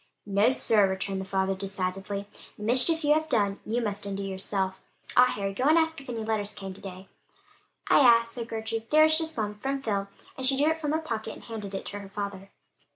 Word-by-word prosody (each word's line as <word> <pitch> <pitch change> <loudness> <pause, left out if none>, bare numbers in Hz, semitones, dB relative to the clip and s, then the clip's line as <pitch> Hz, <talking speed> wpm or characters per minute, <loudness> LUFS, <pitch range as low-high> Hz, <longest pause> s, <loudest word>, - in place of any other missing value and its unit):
"No, 205 +3 +3
sir," 220 -6 +4
returned 190 0 -2
the - - -6
father 190 0 0
decidedly, 195 +1 -4 0.3
"the 210 - -8
mischief 260 +9 +3
you 295 0 +5
have 315 +1 0
done 200 -6 +1
you 235 +2 0
must 205 -2 -2
undo 200 0 -3
yourself. 190 0 -2 0.4
Ah, 250 0 +7
Harry, 200 -4 -3
go 250 +7 -2
and 310 +3 +5
ask 320 -2 +1
if 270 - -12
any 230 -2 -3
letters 215 -2 -2
came 195 -1 -6
to 190 - -13
day." 190 0 -9 0.8
"I - - +6
asked," 230 -3 +5
said 235 -2 -5
Gertrude. 225 0 -4
"There 310 +1 +6
was 315 0 +5
just 320 -2 -2
one; 210 -1 -3
from 275 +4 -2
Phil," 200 -4 -1 0.3
and 260 -1 -2
she 270 0 +3
drew 295 +3 +3
it 320 0 -4
from 300 -1 -1
her - - +3
pocket 225 -9 -4
and - - -13
handed 210 -4 -6
it - - -5
to 205 - -5
her 200 -1 -10
father. 195 -1 -5
215 Hz, 225 wpm, -27 LUFS, 195-260 Hz, 0.8 s, Ah